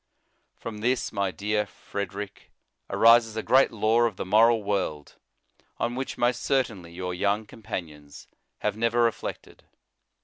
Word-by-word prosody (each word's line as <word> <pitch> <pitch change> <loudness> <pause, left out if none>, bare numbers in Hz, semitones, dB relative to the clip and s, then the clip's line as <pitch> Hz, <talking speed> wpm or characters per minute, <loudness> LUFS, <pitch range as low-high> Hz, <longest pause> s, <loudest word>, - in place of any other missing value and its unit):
From 110 -2 -7
this, 125 +4 0
my 100 -2 0
dear 105 +2 -1
Frederic, 100 0 -7 0.4
arises 115 -1 +5
a 110 - -2
great 135 +1 +5
law 110 +1 +2
of 115 -4 +1
the - - -5
moral 110 +3 +4
world, 95 -8 -3 0.6
on 120 - -1
which, 130 +2 -4
most 120 0 +1
cer 135 -1 +2
tainly, 95 -9 -11
your 90 0 -4
young 100 +4 0
companions 75 -10 -8 0.3
have - - 0
never 115 +1 +2
reflected. 115 -2 -3
105 Hz, 140 wpm, -26 LUFS, 100-115 Hz, 0.6 s, arises